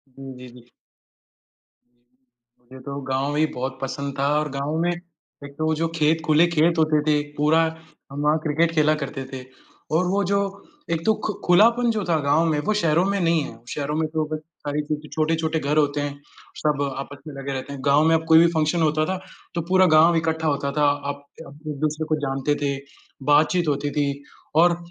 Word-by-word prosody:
जी, 135 -1 -9
जी, 125 - -10
जी। 120 - -27 1.2
हुँ, 120 - -45 0.8
मुझे 130 - -10
तो 140 0 -5
गाँव 135 +2 0
ही 155 +1 +3
बहुत 130 +1 -4
पसंद 140 +1 -4
था 140 - +2
और 150 0 -2
गाँव 140 +3 -2
में 175 - +1
एक 170 -4 -12
तो 155 - -1
वो 160 - +2
जो 165 +1 0
खेत 160 0 +2
खुले 155 +2 +5
खेत 165 0 +2
होते 155 -1 +3
थे, 150 -1 +3 0.2
पूरा 150 +2 +4 0.5
हम 140 +1 -5
वहाँ 150 +1 +3
क्रिकेट 160 +2 +1
खेला 155 -1 +4
करते 135 -1 -5
थे 130 -1 -6 0.5
और 180 - +1
वो 200 +2 +1
जो 200 - +3 0.5
एक 165 -1 0
तो 220 - +4
खु 215 - -1
खुलापन 230 +7 +5
जो 215 -2 -2
था 165 - +3
गाँव 145 +4 +2
में, 155 -2 +1
वो 210 +8 0
शहरों 170 -5 +2
में 200 0 0
नहीं 165 -2 +2
है। 115 - -9
शहरों 145 +2 -3
में 160 0 0
तो 155 0 -1
बस 155 - -2 0.3
सारी 145 +1 0
चीज़ें 150 0 -5
छोटे-छोटे 160 +1 0
घर 150 +1 -1
होते 145 -1 +2
हैं, 145 0 -4 0.4
सब 150 -2 0 0.2
आपस 140 +1 -7
में 150 - -7
लगे 140 0 -5
रहते 130 +1 -5
हैं, 140 - -7
गाँव 145 +2 +4
में 165 - +5
अब 160 - 0
कोई 160 0 +7
भी 170 - +6
फंक्शन 160 +2 +1
होता 155 0 +2
था, 190 +3 -2 0.4
तो 170 - 0
पूरा 185 0 +5
गाँव 165 +2 +6
इकट्ठा 160 0 -1
होता 140 -1 0
था। 150 +1 0 0.3
आप 145 0 -6 0.2
एक-दूसरे 155 0 -4
को 155 - +1
जानते 135 +1 -1
थे, 140 -1 0 0.6
बातचीत 155 +4 +3
होती 145 0 0
थी 140 -1 -2 0.3
और 170 +1 +5
155 Hz, 205 wpm, -23 LUFS, 140-165 Hz, 1.2 s, कोई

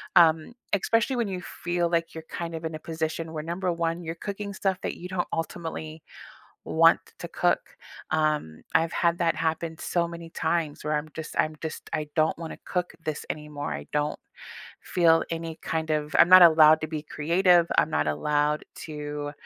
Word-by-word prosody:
um, 160 +3 +5 0.2
especially 230 +6 +2
when 235 -3 0
you 185 -2 -4
feel 175 -1 -2
like 165 -1 0
you're 160 - -6
kind 170 -1 -5
of 160 0 -6
in 160 0 -3
a - - -6
position 160 0 -4
where, 155 -1 -4
number 175 +3 -2
1, 170 0 -2
you're 165 0 -4
cooking 200 +3 -5
stuff 190 -1 0
that - - -3
you 180 - -7
don't 185 -1 -2
ultimately 160 -1 -4 0.6
want - - +5
t - - -19
to - - -5
cook, - - 0 0.4
um, 150 - 0
I've 165 +1 +2
had 170 -1 +2
that 170 -1 +1
happen 160 0 -2
so 170 0 0
many 170 -1 -9
times 165 -2 -1
where 150 +1 -1
I'm 155 +1 -5
just 160 -1 -7
I'm 155 0 +1
just 160 -1 -6
I 155 -1 -1
don't 155 -1 +2
wanna 165 -1 -7
cook 180 -1 -2
this 155 -2 -4
anymore, 150 -1 -4
I - - -6
don't 150 0 -1 0.6
feel 165 -2 +3
any 165 -1 -4
kind 160 -1 -2
of 150 -1 -1
I'm - - +7
not 185 0 +10
allowed 155 -2 +7
to 155 - -1
be 155 -1 -5
creative, 170 +3 +3
I'm - - +4
not 75 0 +1
allowed 150 - 0 0.2
to, 150 -1 -5
165 Hz, 190 wpm, -26 LUFS, 155-170 Hz, 0.6 s, not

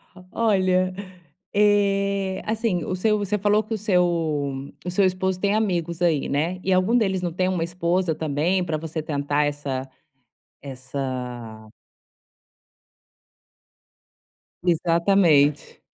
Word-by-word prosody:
O 185 - -14
olha, 185 -4 +2 0.6
eh, 200 -2 +2
assim, 215 -5 -1
o 185 - -3
seu 210 +3 +1
você 205 0 -1
falou 210 +2 +2
que 215 +2 -5
o - - -1
seu 190 -3 +2 0.8
o - - -2
seu 195 +2 +3
esposo 185 0 0
tem 200 +1 +1
amigos 175 -6 -1
aí, 165 -5 +2
né? 165 +6 -1
E 190 - +1
algum 185 +6 +3
deles 190 -5 +1
não 175 -1 -2
tem 185 +2 0
uma 185 -3 0
esposa 170 0 0
também 160 +5 0
para 160 -3 -2
você 160 0 -5
tentar 145 -1 -1
essa 140 -3 -3 0.7
essa 125 -4 -6 3.0
Exatamente. 170 -3 +2
180 Hz, 120 wpm, -23 LUFS, 155-195 Hz, 3.0 s, seu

